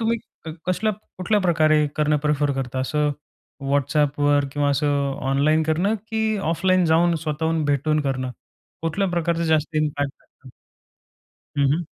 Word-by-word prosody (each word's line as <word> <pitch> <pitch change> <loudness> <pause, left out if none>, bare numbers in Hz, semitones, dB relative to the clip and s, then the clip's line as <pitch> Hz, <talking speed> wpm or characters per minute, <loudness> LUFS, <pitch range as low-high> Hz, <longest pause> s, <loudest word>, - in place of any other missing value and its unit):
तुम्ही 230 +1 +1 0.5
कसल्या 215 +4 +1 0.3
कुठल्याप्रकारे 165 -6 +3
करणं 150 0 +2
प्रिफर 145 -1 +1
करता? 130 -1 -3
असं 150 +2 0 0.6
WhatsAppवर 145 0 +2
किंवा 145 -1 +1
असं 145 +1 +1 0.4
ऑनलाईन 155 +3 +3
करणं, 170 +7 +1
की 220 0 -1 0.3
ऑफलाईन 185 +1 +2
जाऊन 170 +1 +3
स्वतःहून 160 +1 -1
भेटून 145 +2 +1
करणं. 130 -1 -2 0.5
कुठल्या 175 +4 0
प्रकारचं 170 -1 0
जास्त 155 0 0
इम्पॅक्ट 145 -2 -2
येतं? 130 - -19 1.1
हं, 140 0 +3
हं. 170 +2 -1
155 Hz, 125 wpm, -23 LUFS, 145-170 Hz, 1.1 s, कुठल्याप्रकारे